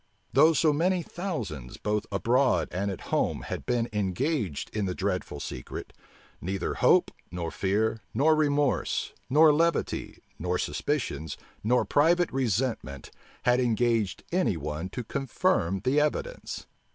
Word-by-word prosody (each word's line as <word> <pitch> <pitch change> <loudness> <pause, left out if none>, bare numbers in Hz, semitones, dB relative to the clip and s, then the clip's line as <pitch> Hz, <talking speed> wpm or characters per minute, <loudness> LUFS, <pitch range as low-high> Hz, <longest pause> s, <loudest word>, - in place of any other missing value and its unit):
Though 160 +1 +6
so 155 -1 +3
many 175 +4 +1
thousands, 120 - -5
both 105 0 -1
abroad 115 - +2
and 95 +4 -1
at 95 - -7
home, - - +1
had - - -5
been 120 -2 +1
engaged 105 - -1
in 105 -2 0
the 90 -1 -2
dreadful 95 -6 -2
secret, 60 -3 -7 0.5
neither 95 +1 -2
hope, - - +4 0.2
nor 85 -1 -4
fear, 110 +3 0
nor 150 +7 +4
remorse, 145 -2 +1 0.2
nor 150 +3 +6
levity, 165 +3 0 0.2
nor 90 +1 0
suspicions, 80 - -2 0.3
nor 125 +4 +3
private 170 +4 +3
resentment, 120 - -1 0.3
had 125 +1 +4
engaged 115 -4 +1
any 130 - +1
one 75 +4 -4
to 125 - -5
confirm 130 - 0
the 130 +4 +3
evidence. 475 - -2
115 Hz, 130 wpm, -28 LUFS, 95-145 Hz, 0.5 s, Though